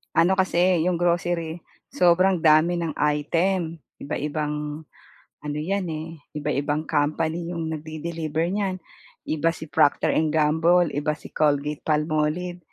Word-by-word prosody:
Ano 170 +3 +4
kasi 180 -1 +3
'yong 180 - +2
grocery 170 -1 0 0.3
sobrang 180 +1 +4
dami 160 +2 +4
ng 165 -3 -3
item, 165 +4 0 0.2
iba-ibang 150 +1 -3 0.6
ano 150 0 -5
'yan, 195 +3 -1
eh, 160 0 -6 0.2
iba-ibang 150 0 -1
company 160 +4 0
'yong 165 -1 -3
nagde-deliver 155 0 -4
niyan. 190 -2 -2 0.4
Iba 160 +2 0
si 160 -2 -10
Procter& 145 - +3 0.2
Gamble, 160 +2 +3
iba 150 +1 -1
si 150 - -13
Colgate-Palmolive, 150 +3 0
160 Hz, 115 wpm, -24 LUFS, 150-175 Hz, 0.6 s, Ano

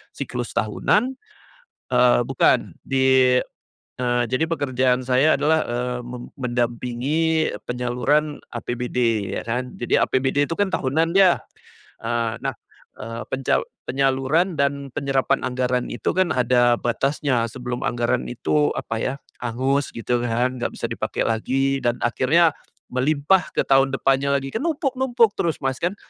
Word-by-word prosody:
siklus 125 -3 -5
tahunan, 210 - +1 0.8
eee, 125 -1 +4
bukan, 135 - +2
di 130 -1 +4 0.6
eee, 120 -1 +1
jadi 130 +5 +1
pekerjaan 130 -5 0
saya 130 +5 +4
adalah, 155 +2 +3
eee, 125 +1 -2
me 125 0 -6 0.2
mendampingi 125 +6 0 0.2
penyaluran 125 +5 0
APBD 120 -3 -1
ya - - -7
kan. 125 +2 -3
Jadi 120 - +1
APBD 135 +2 +1
itu 165 - -3
kan 200 -2 0
tahunan 160 +4 0
ya. 185 -3 +5 0.6
Eee, 115 -1 -1
nah, - - 0 0.5
eee, 115 +2 -6
penca 135 0 +1 0.2
penyaluran 135 +6 +1
dan 140 -1 0
penyerapan 135 0 0
anggaran 125 -1 -1
itu 115 - -1
kan 185 -2 +1
ada 120 -1 +3
batasnya 130 0 0
sebelum 125 +1 -5
anggaran 120 - 0
itu 75 +4 +1
apa - - -4
ya, 130 - -1 0.3
hangus 130 +4 0
gitu 120 +1 -1
kan. 120 +2 0
Nggak - - -2
bisa - - -4
dipake - - -2
lagi 135 +4 0
dan 120 0 +1
akhirnya 155 +8 +3 0.4
melimpah 150 +7 +2
ke - - +2
tahun 135 0 +3
depannya 135 +1 +2
lagi. 135 0 -2
Kan 225 - -2
numpuk-numpuk 265 - +1
terus 165 -2 0
Mas, 135 -1 -1
kan? 180 +4 -1
130 Hz, 135 wpm, -22 LUFS, 120-145 Hz, 0.8 s, ya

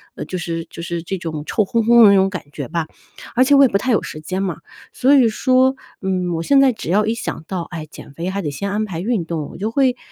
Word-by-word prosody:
呃， - - -5
就 185 - -5
是 165 -1 -4
就 170 - -9
是 170 0 -4
这 190 +2 -4
种 160 -4 -5
臭 215 - +1
烘 230 +3 0
烘 235 +1 +6
的 205 - +9
那 200 - +5
种 190 0 +3
感 185 -4 -6
觉 140 -4 -5
吧。 165 -2 -2 0.5
而 255 - +5
且 285 +2 +3
我 275 - +7
也 - - +7
不 195 - +1
太 255 +6 -1
有 220 - +3
时 155 - -8
间 185 +5 -3
嘛。 185 -5 -2 0.4
所 265 +3 +3
以 250 -4 +5
说， 255 +4 +2 0.3
嗯， 185 -2 -1
我 165 - -2
现 275 +5 +4
在 270 -2 +5
只 220 -7 -5
要 210 +3 +3
一 220 - 0
想 225 -8 -5
到， 185 -3 -3
哎， 160 -2 -6
减 140 - -13
肥 170 +5 -4
还 200 +1 -3
得 150 - -3
先 200 +8 -4
安 215 +1 -1
排 175 -5 -5
运 210 -3 -1
动， 160 -3 -4
我 - - -11
就 210 +4 -2
会 260 -1 +2
195 Hz, 300 characters per minute, -19 LUFS, 170-235 Hz, 0.5 s, 的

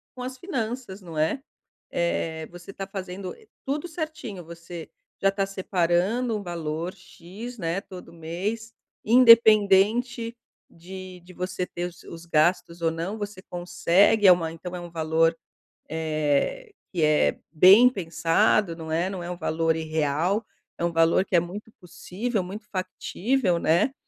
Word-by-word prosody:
com 250 - -6
as 260 +1 -6
finanças, 240 - -4
não 165 -4 -9
é? 160 - +1 0.5
Eh, 160 -2 -1
você 175 +2 -11
tá 195 - -5
fazendo, 190 -1 -6
eh, 445 - -21 0.2
tudo 290 +5 -2
certinho, 310 - -6
você 170 0 -9 0.3
já 195 - +4
tá 195 0 -1
separando 195 +5 0
um 205 - -6
valor 170 0 -4
X, 195 +5 -10
né, 170 -1 -1
todo 185 -2 -11
mês, 195 +8 -4 0.3
independente 230 0 +5 0.3
de 185 +1 -10
de 180 - -14
você 180 0 -3
ter 175 0 -5
os 175 -1 -9
os 170 0 -10
gastos 170 +1 +1
ou 165 -1 +2
não, 170 +6 -4
você 205 -2 -6
consegue, 180 +4 +3
é - - +10
uma 165 -2 +2
então 180 +2 -7
é - - -5
um 175 - -8
valor, 165 0 +2 0.5
eh, 160 - -1 0.2
que 170 -3 0
é 150 0 +3
bem 190 +10 +8
pensado, 175 -1 +1
não 160 -1 -7
é? 170 +3 +1
Não 190 -2 -5
é 175 - -6
um 180 - -5
valor 165 -1 0
irreal, 160 +6 0 0.3
é 170 - -1
um 170 - 0
valor 165 +3 +3
que 190 - -1
é - - +7
muito 195 +6 -7
possível, 200 +5 -3
muito 200 +4 -8
factível, 185 +2 -1
né. 165 +2 +3
Eh, 270 - -6
180 Hz, 155 wpm, -25 LUFS, 165-210 Hz, 0.5 s, é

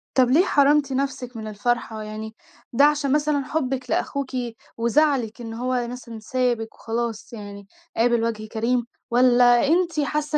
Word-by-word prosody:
طب 255 -2 +4
ليه 325 +8 +5
حرِمتِ 285 -2 +3
نفسِك 260 -3 -3
من 220 - -6
الفرحة؟ 220 +1 -2
يعني 215 +1 -7 0.4
ده 280 +4 +6
عشان 295 -2 +2
مثلًا 295 -1 +1
حُبِك 265 -4 -2
لأخوكِ 280 -2 -1 0.5
وزعلِك 240 -1 +1
إن 225 -1 -6
هو 245 +1 -1
مثلًا 240 -2 -8
سابِك 235 0 -1
وخلاص 230 0 -4
يعني 200 -2 -9 0.3
قابل 235 0 +3
وَجه 220 -2 -2
كريم؟ 235 +2 0 0.3
والّا 245 +1 +5
أنتِ 335 -1 +2
حاسّة 300 +1 0
245 Hz, 145 wpm, -23 LUFS, 225-280 Hz, 0.5 s, ده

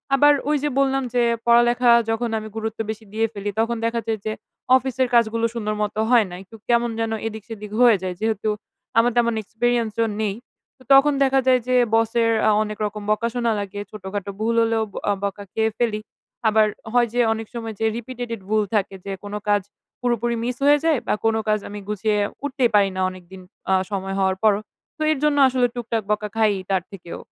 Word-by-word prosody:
আবার 290 +2 +6 0.2
ওই 300 - +3
যে 295 - +1
বললাম 270 0 +2
যে, 245 - +3 0.2
পড়ালেখা 240 +1 +5 0.2
যখন 230 +1 0
আমি 215 - -8
গুরুত্ব 220 0 -4
বেশি 220 0 -5
দিয়ে 225 +1 +1
ফেলি। 205 0 -4
তখন 230 +1 +1
দেখা 230 0 0
যায় 220 -1 -1
যে, 215 - -1 0.5
অফিসের 260 0 -1
কাজগুলো 230 0 +3
সুন্দর 215 -2 -2
মতো 210 +1 -3
হয় 240 -3 +5
না। 175 - -8
একটু 195 +4 -15
কেমন 235 0 +3
যেন 225 0 -1 0.2
এদিক-সেদিক 215 -1 -8
হয়ে 240 -3 +7
যায় 185 -1 -3
যেহেতু 220 -1 -1 0.5
আমার 235 +2 +5
তেমন 235 -1 +3
এক্সপেরিয়েন্স 230 +1 -1
ও - - +2 0.2
নেই। 205 -2 -1 0.4
তো 255 - -19
তখন 275 +2 +6
দেখা 270 0 +3
যায়, 255 -1 +5
যে 255 - +2 0.2
বসের 230 +1 +2 0.2
আ - - +5
অনেক 215 0 -6
রকম 210 0 -5
বকা 215 +2 +1
শোনা 240 -2 0
লাগে, 200 0 -5
ছোটোখাটো 200 -1 -6
ভুল 230 +1 0
হলেও 225 -1 +1 0.3
অ - - +4
বকা 200 0 -3
খেয়ে 220 0 +1
ফেলি। 225 -3 0 0.5
আবার 215 0 +4 0.3
হয় 245 -1 +4
যে 245 - 0
অনেক 225 0 -6
সময় 225 -2 -5
যে 225 - 0
রিপিটেটেড 240 -2 -6
ভুল 215 0 +2
থাকে 200 -1 0
যে, 200 - -4
কোনো 205 0 -5
কাজ 205 0 +3 0.4
পুরোপুরি 240 -1 0
মিস 245 +1 -2
হয়ে 290 +1 +6
যায়, 315 -5 +3
বা - - +2
কোনো 225 0 +2
কাজ 215 0 +2
আমি 205 0 -7
গুছিয়ে 210 0 0 0.3
উঠতেই 260 -3 +1
পারি 200 -1 +5
না, 185 - -2
অনেকদিন 185 0 -12 0.3
আ - - +5 0.2
সময় 195 -1 -3
হওয়ার 190 -1 +1
পরও 210 -1 +4 0.4
তো - - -11
এর 310 - +1
জন্য 300 -1 +3
আসলে 255 -1 +2
টুকটাক 230 -2 -2
বকা 210 0 0
খাই 220 -2 +3 0.2
তার 190 -2 +1
থেকেও। 175 -3 -9
225 Hz, 200 wpm, -22 LUFS, 210-240 Hz, 0.5 s, হয়ে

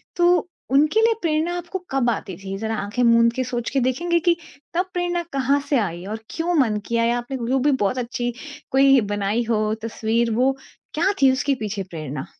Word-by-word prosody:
तो 350 -1 +3 0.2
उनके 305 +10 +4
लिए 455 0 +4
प्रेरणा 325 +1 0
आपको 350 +2 -5
कब 265 -3 +2
आती 195 -4 -3
थी? 195 0 -6
जरा 220 +2 -2
आँखें 210 +4 -3
मूँद 230 0 +5
के 255 - -1
सोच 240 -1 -3
के 270 - 0
देखेंगे 340 +8 +1
कि 340 +1 +3 0.4
तब 360 +2 +1
प्रेरणा 350 -1 -1
कहाँ 275 +1 +2
से 280 - +3
आई 175 -3 -3
और 215 +2 -5
क्यों 340 +2 -2
मन 220 -5 +2
किया 230 0 0
या 240 +1 +2
आपने 245 +2 -4
जो 265 +2 +2
भी 290 +3 +3
बहुत 250 -2 0
अच्छी 245 0 -2 0.4
कोई 270 -1 +5
बनाई 205 +3 0
हो 215 -1 +1
तस्वीर 230 +1 0
वो 255 +3 +3 0.4
क्या 350 +6 +2
थी 265 -1 +7
उसके 275 +1 0
पीछे 205 -2 -3
प्रेरणा? 155 -4 -5
250 Hz, 200 wpm, -22 LUFS, 220-305 Hz, 0.4 s, थी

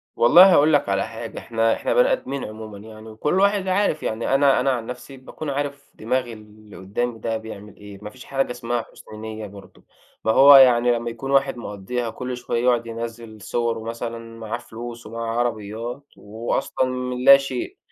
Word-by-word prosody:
والله 175 +10 +7
هاقول 155 0 +5
لك 145 - +2
على 100 +1 0
حاجة، 115 0 -7
إحنا 115 -1 0
إحنا - - -1
بني - - +4
آدمين 140 - -3
عمومًا، 110 -1 -9
يعني، 110 +1 -12
وكل 150 +11 -1
واحد 200 -1 +2
عارف، 185 -4 +1
يعني 115 +4 -1
أنا 135 -1 +4
أنا 135 +2 +2
عن 120 -3 -3
نفسي، 125 +3 -9
باكون 145 +3 -8
عارف 140 0 -4
دماغ 125 +2 -2
اللي 105 -1 -15
قدامي 115 +5 -3
ده 115 +1 -2
بيعمل 105 -2 -10
إيه، 100 -1 -12
ما 105 - -7
فيش 130 +3 -14
حاجة 135 -2 -1
اسمها 120 -1 -3
حُسن 110 - -14
نية 110 -1 -6
برضه، 100 0 -15 0.4
ما 110 - +3
هو 140 +5 +8
يعني 125 -2 +6
لما 120 0 -1
يكون 115 +4 -6
واحد 135 -2 +2
مقضّيها 115 +2 -4
كل 125 +2 -5
شوية 120 -1 -2
يقعد 120 -2 +2
ينزِّل 115 -1 -7
صُوَرُه، 115 +1 -2
مثلًا، 115 0 -7
معاه 115 +1 -4
فلوس، 120 0 -9
ومعاه 115 +1 -4
عربيات، 115 +2 -3
وهو 110 +3 -5
أصلًا 130 - -1
من 125 0 -3
اللاشيء، 135 0 +4
120 Hz, 185 wpm, -22 LUFS, 110-130 Hz, 0.4 s, هو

